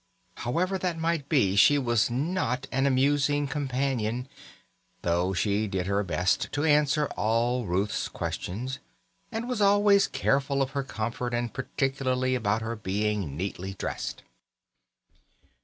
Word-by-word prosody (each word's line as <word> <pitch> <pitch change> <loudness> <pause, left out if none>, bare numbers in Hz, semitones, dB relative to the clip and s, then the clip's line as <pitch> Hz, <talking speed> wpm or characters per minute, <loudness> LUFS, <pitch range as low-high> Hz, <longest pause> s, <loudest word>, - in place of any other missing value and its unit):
However 180 +10 -1
that 180 -3 -1
might 165 -3 -1
be, 105 - +3
she 125 +9 +6
was 120 -4 +2
not 130 -1 -1
an 135 +1 +2
amusing 145 +2 +2
companion; 130 -4 -1 0.8
though 90 +2 +1
she 105 +2 +1
did 95 -2 -2
her 100 +1 +1
best 90 -1 0
to 145 - 0
answer 150 -1 +3
all 115 +2 +1
Ruth's 95 +4 0
questions, 125 +9 -4 0.5
and 230 +1 -3
was 250 -4 -2
always 200 0 +5
careful 140 0 +1
of 135 - -5
her 140 0 -1
comfort, 120 +1 -3
and 120 -1 -2
particular 130 -1 -1
about 110 -2 0
her 115 +1 -3
being 105 -6 -2
neatly 95 +1 -4
dressed. - - -4
125 Hz, 130 wpm, -27 LUFS, 105-145 Hz, 0.8 s, she